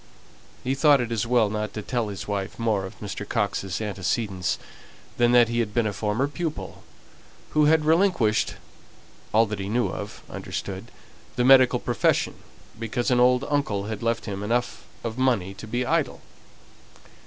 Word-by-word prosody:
He 130 - 0
thought 145 0 +5
it 120 -2 -2
as 115 0 -1
well 120 -3 +4
not 105 0 -3
to 105 - -4
tell 120 -1 -1
his 100 -2 -6
wife 100 -2 -3
more 110 -4 0
of 95 - -14
Mr. 100 0 -5
Coxe's 100 -4 -2
antecedents 95 -2 -1 0.6
than 120 0 +4
that 120 -1 +7
he 120 +1 -1
had 105 -3 -2
been 120 -2 +2
a 105 - -1
former 105 +6 0
pupil; 160 +1 -5 0.7
who 150 -1 +4
had 155 0 +4
relinquished 160 - +2 0.8
("all 110 +2 +5
that 105 -1 -5
he 95 0 -4
knew 120 +3 +1
of," - - -7
understood) - - -6 0.5
the 125 - +1
medical 130 -1 +7
profession - - +1 0.5
because 120 +3 -1
an 125 - +4
old 125 +2 +4
uncle 140 -9 0
had 110 -1 -5
left 115 -1 -1
him 100 -2 -4
enough 120 +4 -1 0.2
of 115 +2 -4
money 115 -8 +1
to 100 +3 -10
be 120 +3 -1
idle. 155 -1 0
115 Hz, 165 wpm, -25 LUFS, 105-125 Hz, 0.8 s, that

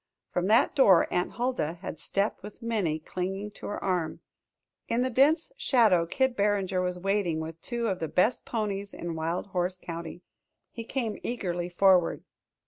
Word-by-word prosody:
From 180 +1 0
that 220 +3 +4
door 200 - +6
Aunt 180 - 0
Huldah 240 -11 -1
had - - -6
stepped 200 +2 -1
with 210 +4 -11
Minnie 205 -9 0
clinging 190 +5 -4
to - - -9
her 205 - -4
arm. 180 -4 -1 0.7
In 235 +2 +1
the 255 - -1
dense 285 - +3
shadow 215 - +4
Kid 265 +6 +1
Barringer 200 -3 +1
was 180 0 -1
waiting 190 -3 0
with 160 +1 -6
two 235 -1 -2
of 190 -3 -1
the 160 - -2
best 185 - +2
ponies 205 -3 -3
in 170 -1 -4
Wild 165 +2 -2
Horse 180 0 -1
County. 170 0 -7 0.5
He 230 - -6
came 235 -4 -3
eagerly 180 -7 -3
forward. 180 -1 +3
195 Hz, 165 wpm, -28 LUFS, 175-225 Hz, 0.7 s, door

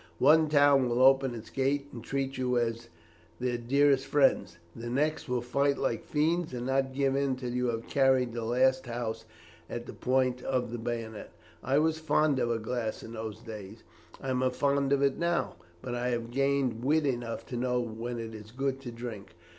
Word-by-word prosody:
One 155 0 +5
town 140 -3 +5
will 120 +2 +2
open 135 -1 +5
its 110 -1 -9
gates 140 +1 -1
and 115 -2 -8
treat 135 +1 -2
you 125 -1 0
as 115 0 -1 0.5
their 125 -1 -1
dearest 135 +2 +3
friends, 100 -11 +2 0.2
the 120 +1 -6
next 150 +3 0
will 125 -1 0
fight 140 +3 +1
like 115 -5 -1
fiends 155 0 0
and 120 0 -4
not 135 0 +1
give 135 -1 +1
in 140 -1 +1
till 125 -1 -5
you 125 0 0
have 115 -1 -2
carried 130 -3 +2
the 115 -1 -3
last 130 +3 +2
house 115 -2 -4 0.4
at - - -5
the - - -8
point 125 -1 +1
of 125 -3 -1
the 120 - -4
bayonet. 115 -2 -5 0.3
I 135 +1 +2
was 160 +1 +2
fond 150 -3 +2
of 120 - +1
a 115 - +1
glass 115 0 -3
in 115 - -9
those 110 -1 -6
days; 110 -2 -9 0.4
I 135 - -3
am 130 0 0
fond 140 +1 +1
of 140 0 +3
it 140 -1 +1
now, 170 - 0 0.3
but 125 - -4
I 120 +1 -1
have 120 -1 -2
gained 135 -3 0
wit 150 +3 +2
enough 120 -4 -2
to 125 - -4
know 125 0 0
when 120 +1 -4
it 115 -1 -6
is 110 -1 -10
good 135 +2 -2
to 125 -3 -6
drink. 115 -4 -8
125 Hz, 200 wpm, -29 LUFS, 115-140 Hz, 0.5 s, One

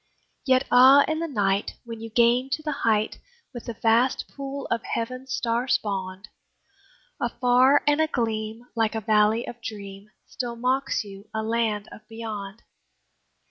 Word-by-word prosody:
Yet 260 0 +4
ah! 265 +3 +8
in 315 0 -1
the 335 - -2
night 205 -7 0
when 230 -1 -8
you 225 - -7
gain 240 +3 +3
to 310 - -3
the 305 - -2
height, 215 -1 +1 0.3
With 240 - -8
the 235 - -5
vast 230 +3 +2
pool 275 0 -6
of 230 -1 +1
heaven 255 +4 -4
star 245 -1 -1
spawned, 195 -4 -2 0.9
Afar 250 +3 +3
and 295 +1 +3
agleam, 225 -6 -2
like 225 -1 +1
a 220 - -2
valley 215 +2 +2
of 240 0 -8
dream, 200 -2 -8 0.2
Still 245 -3 -5
mocks 255 +3 0
you 200 0 -12
a 220 - -1
Land 220 -2 -1
of - - -11
Beyond. 220 -2 -7
230 Hz, 150 wpm, -25 LUFS, 215-255 Hz, 0.9 s, ah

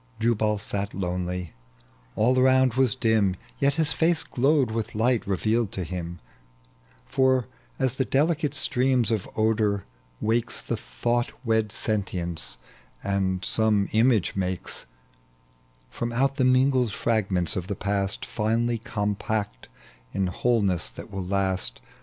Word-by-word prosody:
Jubal 110 -2 +1
sat 100 0 -4
lonely, 90 -2 -3 0.6
all 125 +4 +3
around 130 -1 +4
was 130 -1 +2
dim, 110 -6 +2 0.2
Yet 140 -1 +2
his 160 -2 +2
face 165 -3 +2
glowed 135 -1 +2
with 110 -1 -3
light 115 +1 +1
revealed 110 +3 0
to 95 - -3
him: 85 0 -5 0.9
For 130 - +2 0.3
aa 130 - +2
the 130 +1 0
delicate 150 +1 +1
stream 125 -1 +5
of 110 -4 -1
odor 110 -2 +1 0.3
wakes 115 +2 0
The - - -3
thoT^M 120 - -1 0.2
wed 110 -2 +1
sentience, 90 - -2 0.5
and 95 -2 -1
some 110 -3 +2
image 110 -2 +3
makes 95 -7 -3 1.0
From 120 - -3
out 135 +3 +1
the 130 - +3
mingled 130 -2 +3
fragments 95 -7 0
of 90 -1 -3
the 100 - -3
past, 100 0 -2
Finely 115 +2 0
compact 105 - -3 0.5
in 95 - 0
wholeness 100 -1 +1
that - - -11
will 95 -2 -4
last. 95 -7 0
110 Hz, 130 wpm, -25 LUFS, 95-125 Hz, 1.0 s, stream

